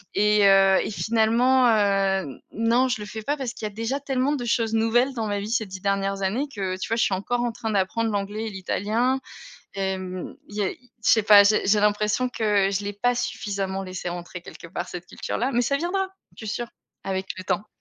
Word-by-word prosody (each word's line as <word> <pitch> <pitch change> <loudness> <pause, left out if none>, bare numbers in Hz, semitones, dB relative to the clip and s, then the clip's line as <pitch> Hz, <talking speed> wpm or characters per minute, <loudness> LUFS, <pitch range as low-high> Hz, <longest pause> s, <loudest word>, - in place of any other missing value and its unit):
et 210 0 +4
heu 195 -1 +6
et - - -3
finalement, 230 +6 +3
heu, 195 - +1
non 230 +4 +2
je 220 -3 -1
le - - -5
fais 220 +1 -7
pas, 290 +4 0
parce 250 -3 -4
qu'il 215 - -7
y 210 - -3
a - - -21
déjà 230 +6 -2
tellement 270 0 0
de 245 -3 -4
choses 225 -1 0
nouvelles 240 +4 +2
dans 225 -3 -2
ma 205 -1 -1
vie 205 +2 -5
ces 225 -2 +1
10 190 -1 -9
dernières 195 0 -1
années 240 +10 0
que, 190 -2 -2
tu - - -4
vois 230 - +1
je 220 - +3
suis 195 - +1
encore 240 +6 -1
en 240 - 0
train 225 -1 -4
d'apprendre 215 +3 0
l'anglais 205 +2 -3
et - - -3
l'italien. 215 +7 0 0.6
Hem, 190 -2 -4
il 210 - -10
y 210 - 0
a 190 - 0
i 250 -1 -20
je - - +5
sais 220 - +2
pas, 205 -1 +8
j'ai 210 -1 +3
j'ai 205 +1 +4
l'impression 210 +4 +1
que, 205 -5 +1
je 200 +1 -2
l'ai 205 - -3
pas 245 +5 +1
suffisamment 195 -4 -3
laissée 185 -1 -5
rentrer 175 0 -7
quelque 170 - -11
part - - -5
cette 175 0 -7
culture-là, 255 +3 -3
mais 240 +1 +2
ça 280 +4 +1
viendra 370 +5 -1 0.3
je 220 - -8
suis 205 - -2
sûre, 240 -1 -4 0.4
avec 190 0 -2
le 185 - -6
temps. 195 +3 -1
210 Hz, 235 wpm, -24 LUFS, 195-235 Hz, 0.6 s, pas